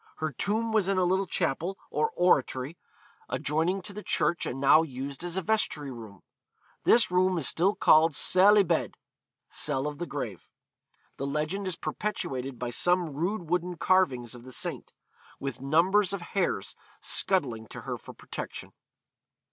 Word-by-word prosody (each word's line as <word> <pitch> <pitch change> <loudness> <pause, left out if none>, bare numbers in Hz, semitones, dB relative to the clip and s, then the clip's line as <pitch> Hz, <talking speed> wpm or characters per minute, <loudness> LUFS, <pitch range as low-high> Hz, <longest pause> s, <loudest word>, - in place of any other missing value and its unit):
Her 155 -1 -3
tomb 220 - -1
was 210 -4 +2
in 195 - +1
a 185 - +3
little 190 +2 +1
chapel, 170 +4 -1
or 455 - +1
oratory, 140 -4 +1 0.5
adjoining 165 +6 -1
to 205 - -8
the 210 - -7
church 175 - 0
and 130 - -4
now 140 +3 +6
used 140 0 -6
as 175 +1 -3
a 190 - -1
vestry 160 -9 0
room. 110 -6 -11 0.6
This 235 -5 +5
room 185 0 +2
is 155 - 0
still 190 +5 +2
called 155 0 +5
cell 195 +3 +7
y 205 - +6
bedd, 180 - -1 0.5
(cell 140 -2 -1
of 150 0 -4
the 175 - -4
grave).... 115 -11 -6 0.7
The 140 - -3
legend 155 +7 -2
is 185 - -2
perpetuated 135 - -4
by 120 -1 -4
some 175 +3 +1
rude 175 +5 -2
wooden 180 +1 -1
carvings 135 -13 +1
of 120 - -10
the 130 +2 -12
saint, - - -4 0.5
with 135 -2 -5
numbers 185 +8 +3
of 200 - -3
hares 180 - -1 0.3
scuttling 125 - 0
to - - -9
her - - -5
for - - -12
protection.' - - -7
165 Hz, 165 wpm, -28 LUFS, 135-190 Hz, 0.7 s, cell